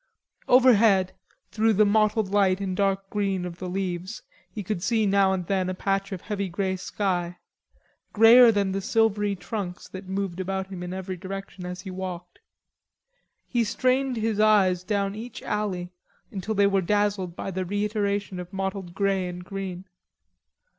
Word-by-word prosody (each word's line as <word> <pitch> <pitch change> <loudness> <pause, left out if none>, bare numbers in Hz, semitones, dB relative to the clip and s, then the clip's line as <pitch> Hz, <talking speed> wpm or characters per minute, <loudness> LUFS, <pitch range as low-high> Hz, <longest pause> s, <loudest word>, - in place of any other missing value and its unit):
Overhead, 225 -7 +5 0.4
through 220 +2 +2
the 215 +1 +4
mottled 215 0 +2
light 195 -2 +3
and 190 -2 -3
dark 195 0 0
green 195 -3 -1
of 175 -1 -7
the 185 - -5
leaves 185 +1 -4 0.3
he 210 - -6
could 190 -2 -3
see 220 +2 +1
now 195 -1 +3
and 185 -2 -2
then 185 0 0
a 185 - -3
patch 195 +1 -1
of 190 -2 -5
heavy 200 -2 -3
grey 190 +2 -1
sky, 180 -2 -2 0.7
greyer 230 +2 +8
than 200 -3 0
the 195 +1 -2
silvery 205 -1 +1
trunks 180 0 -5
that 190 0 -9
moved 190 -2 -3
about 190 +1 -3
him 185 -2 -6
in 180 0 -5
every 185 0 -5
direction 195 0 -7
as 180 0 -6
he 190 - -7
walked. 180 -1 -7 1.1
He 240 -2 +1
strained 255 +3 +1
his 220 -1 -1
eyes 195 -4 +4
down 200 0 -1
each 225 +3 -8
alley 190 -4 -2 0.4
until 210 +2 -3
they 200 0 +4
were 195 -1 +2
dazzled 200 -2 0
by 195 - -5
the 185 0 -2
reiteration 205 0 -2
of 180 0 -8
mottled 190 -2 -4
grey 195 -2 +1
and 180 0 -7
green. 190 -2 -6
195 Hz, 165 wpm, -25 LUFS, 185-210 Hz, 1.1 s, greyer